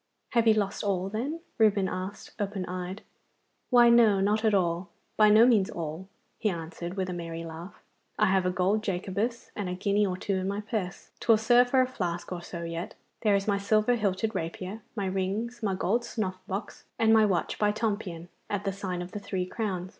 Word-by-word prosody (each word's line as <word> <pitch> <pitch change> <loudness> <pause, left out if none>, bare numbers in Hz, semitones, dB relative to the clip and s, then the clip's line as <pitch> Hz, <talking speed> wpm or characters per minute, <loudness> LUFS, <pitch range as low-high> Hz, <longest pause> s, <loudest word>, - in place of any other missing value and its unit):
'Have 235 -1 +3
you 220 - +6
lost 205 -1 -1
all, 190 -2 0
then?' 270 +11 -3 0.2
Reuben 205 -3 +4
asked, 185 +3 -5
open 200 -2 -2
eyed. 185 +2 -5 0.7
'Why 240 -2 +7
no 225 -4 +6
not 210 +3 +2
all 175 -2 +1 0.3
by 215 -1 +6
no 215 +2 +7
means 220 -6 +4
all!' 165 +2 -5 0.3
he 215 - +1
answered, 170 0 -5
with 190 -2 -1
a 180 - -3
merry 165 -1 -5
laugh; 165 +3 -9 0.3
'I 215 - +4
have 190 -2 +2
a - - +3
gold 185 +4 +1
Jacobus 205 +5 -2
and 200 -3 -3
a 180 - -2
guinea 200 +2 +1
or 180 -1 -2
two 195 +1 -1
in 185 0 -2
my 200 +1 -2
purse. 210 -4 -4
'Twill 225 -2 +4
serve 240 +3 +4
for 260 0 +4
a 255 - +2
flask 175 -9 -4
or 180 -1 -4
so 170 0 -7
yet. 170 +5 -5 0.3
There 210 -3 +4
is 195 +1 -1
my 200 -1 +2
silver 215 +3 +3
hilted 210 -1 0
rapier, 185 +6 -4
my 200 -3 -2
rings, 195 +6 -2
my 200 -4 0
gold 215 +6 +1
snuff 190 -6 -3
box, 195 +3 -5
and 225 -1 +4
my 220 -1 +6
watch 180 -4 -1
by 210 -1 +3
Tompion 205 -6 -3 0.2
at 205 -1 -2
the 195 - -1
sign 185 -2 -4
of 180 - -9
the 210 - -5
Three 190 -2 -3
Crowns. 185 -3 -3
195 Hz, 205 wpm, -28 LUFS, 180-215 Hz, 0.7 s, Why